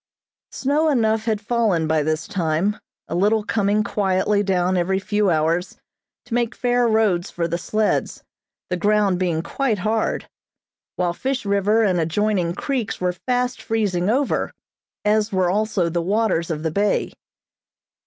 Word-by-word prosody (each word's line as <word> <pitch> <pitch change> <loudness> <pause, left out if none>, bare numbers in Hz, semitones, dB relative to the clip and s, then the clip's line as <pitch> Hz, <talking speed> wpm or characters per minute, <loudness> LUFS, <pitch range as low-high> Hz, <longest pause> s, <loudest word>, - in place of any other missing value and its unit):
Snow 295 +4 +1
enough 220 -5 +1
had 220 -3 0
fallen 210 -6 +1
by 155 0 +1
this 155 +2 -1
time, 175 +3 0 0.3
a - - -5
little 210 +5 +2
coming 210 0 +1
quietly 200 -1 +1
down 185 -2 +1
every 185 +2 +1
few 205 +1 0
hours, 165 +2 0 0.5
to 245 - -8
make 240 0 0
fair 245 -1 +2
roads 210 -5 +2
for 170 -1 -2
the 170 +1 -2
sleds, 215 +4 -1 0.5
the 180 - 0
ground 205 -1 +2
being 170 -3 0
quite 255 -1 -1
hard; 215 +3 -1 0.7
while 175 -1 0
Fish 260 +4 -3
River 200 +3 +2
and 185 -4 +2
adjoining 175 +1 0
creeks 260 -6 -2
were 180 0 0
fast 245 +7 -2
freezing 200 -5 0
over, 270 +4 0 0.5
as 215 +1 +2
were 185 -2 +2
also 205 -3 0
the 170 +1 -1
waters 195 -2 0
of 155 -2 -3
the 160 - -1
bay. 205 +5 0
205 Hz, 150 wpm, -22 LUFS, 175-220 Hz, 0.7 s, little